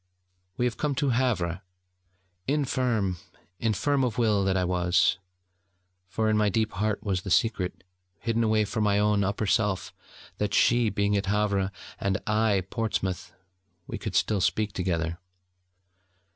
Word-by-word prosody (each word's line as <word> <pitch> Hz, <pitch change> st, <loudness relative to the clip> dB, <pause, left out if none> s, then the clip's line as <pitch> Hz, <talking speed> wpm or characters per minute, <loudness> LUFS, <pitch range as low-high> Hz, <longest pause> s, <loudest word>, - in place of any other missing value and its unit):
We 125 Hz, -, +2 dB
came 145 Hz, +4 st, -2 dB
to 140 Hz, +1 st, +1 dB
Havre 105 Hz, -8 st, 0 dB, 0.9 s
infirm, 125 Hz, -9 st, 0 dB, 0.4 s
infirm 130 Hz, +5 st, +1 dB
of 120 Hz, -4 st, -1 dB
will 110 Hz, -4 st, +2 dB
that 95 Hz, 0 st, +2 dB
I 90 Hz, -, +1 dB
was: 90 Hz, +1 st, +2 dB, 0.9 s
for 110 Hz, +4 st, -1 dB
in 110 Hz, -, +2 dB
my 105 Hz, -1 st, +3 dB
deep 110 Hz, +2 st, 0 dB
heart 105 Hz, +1 st, -1 dB
was 95 Hz, -4 st, -1 dB
the 95 Hz, -, -6 dB
secret, 95 Hz, -3 st, +1 dB, 0.3 s
hidden 115 Hz, +3 st, 0 dB
away 110 Hz, -1 st, +2 dB
from 110 Hz, +1 st, -2 dB
my 100 Hz, -1 st, +2 dB
own 105 Hz, -1 st, +2 dB
upper 100 Hz, +2 st, -1 dB
self, 105 Hz, -3 st, 0 dB, 0.5 s
that, 105 Hz, -1 st, 0 dB
she 120 Hz, -2 st, +4 dB
being 100 Hz, 0 st, +1 dB
at 100 Hz, -1 st, -1 dB
Havre, 100 Hz, -1 st, +1 dB, 0.3 s
and 100 Hz, -1 st, 0 dB
I 105 Hz, -1 st, +2 dB
at 95 Hz, 0 st, -5 dB
Portsmouth, 105 Hz, -5 st, -2 dB, 0.5 s
we -, -, -6 dB
could -, -, -5 dB
still 105 Hz, -3 st, +2 dB
speak 105 Hz, +2 st, 0 dB
together. 85 Hz, -2 st, -2 dB
105 Hz, 145 wpm, -27 LUFS, 95-110 Hz, 0.9 s, she